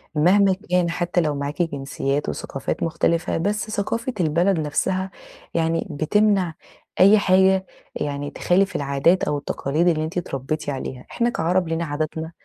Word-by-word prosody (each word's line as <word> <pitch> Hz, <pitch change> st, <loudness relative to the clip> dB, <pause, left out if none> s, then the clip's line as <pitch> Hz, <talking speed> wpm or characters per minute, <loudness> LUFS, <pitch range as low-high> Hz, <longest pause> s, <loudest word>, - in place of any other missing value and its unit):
مهما 190 Hz, +5 st, +4 dB, 0.2 s
كان 180 Hz, -1 st, +2 dB
حتى 175 Hz, +1 st, 0 dB
لو 150 Hz, -3 st, 0 dB
معاكِ 140 Hz, +4 st, -3 dB
جنسيات 140 Hz, -2 st, -2 dB
وثقافات 135 Hz, -, -4 dB
مُختلفة، 165 Hz, +1 st, 0 dB
بس 205 Hz, +4 st, -1 dB
ثقافة 230 Hz, +5 st, -2 dB
البلد 170 Hz, +2 st, +2 dB
نفسها، 185 Hz, +5 st, -1 dB, 0.4 s
يعني 165 Hz, 0 st, 0 dB
بتمنع 185 Hz, +3 st, +2 dB, 0.5 s
أي 200 Hz, +3 st, +7 dB
حاجة 190 Hz, 0 st, +4 dB, 0.3 s
يعني 145 Hz, 0 st, -3 dB
تخالف 195 Hz, +3 st, +1 dB
العادات 140 Hz, +6 st, +2 dB
أو 145 Hz, -, 0 dB
التقاليد 145 Hz, +4 st, -1 dB
اللي 155 Hz, -2 st, +2 dB
أنتِ 160 Hz, +3 st, -5 dB
اتربيتِ 155 Hz, -2 st, -3 dB
عليها، 130 Hz, -2 st, -5 dB
إحنا 235 Hz, 0 st, +1 dB
كعرب 180 Hz, -3 st, 0 dB
لينا 165 Hz, +1 st, -1 dB
عادتنا 155 Hz, +2 st, -3 dB
165 Hz, 140 wpm, -22 LUFS, 150-190 Hz, 0.5 s, أي